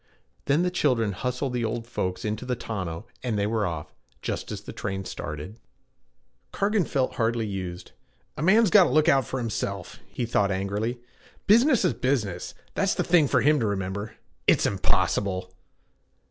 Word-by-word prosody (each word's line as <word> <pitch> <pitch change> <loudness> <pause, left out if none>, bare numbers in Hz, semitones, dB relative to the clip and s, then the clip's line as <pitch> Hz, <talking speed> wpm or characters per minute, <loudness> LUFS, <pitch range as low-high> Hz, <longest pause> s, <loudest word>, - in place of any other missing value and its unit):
Then 150 +5 +3
the 180 - +1
children 125 - +2
hustled 125 +6 -2
the 120 -1 -1
old 115 +1 -2
folks 90 -6 -3
into 110 +2 -2
the 125 0 -1
tonneau 95 -5 -5 0.2
and 120 -4 -1
they 100 - +1
were 110 -2 0
off, 80 -3 -5 0.3
just - - -3
as - - -5
the - - -9
train 95 0 -4
started. 85 +10 -6 0.9
Cargan 200 -2 +1
felt 130 -2 -1
hardly 115 -1 +1
used. 95 -3 -5 0.4
'A - - -5
man's 210 +5 +5
got 205 -4 +8
to - - 0
look 155 +4 +3
out 135 -6 +4
for 130 - -3
himself,' 100 -5 -4
he 120 - -3
thought 105 -4 +2
angrily. 100 +5 -2 0.5
'Business 235 +1 +5
is 180 - +3
business 125 -8 -1 0.2
that's - - +1
the - - +1
thing 165 -4 +4
for - - +3
him 150 0 +4
to 115 - +1
remember. 100 +2 -3 0.3
"It's - - +5
impossible!" 95 -2 0
115 Hz, 170 wpm, -26 LUFS, 100-140 Hz, 0.9 s, got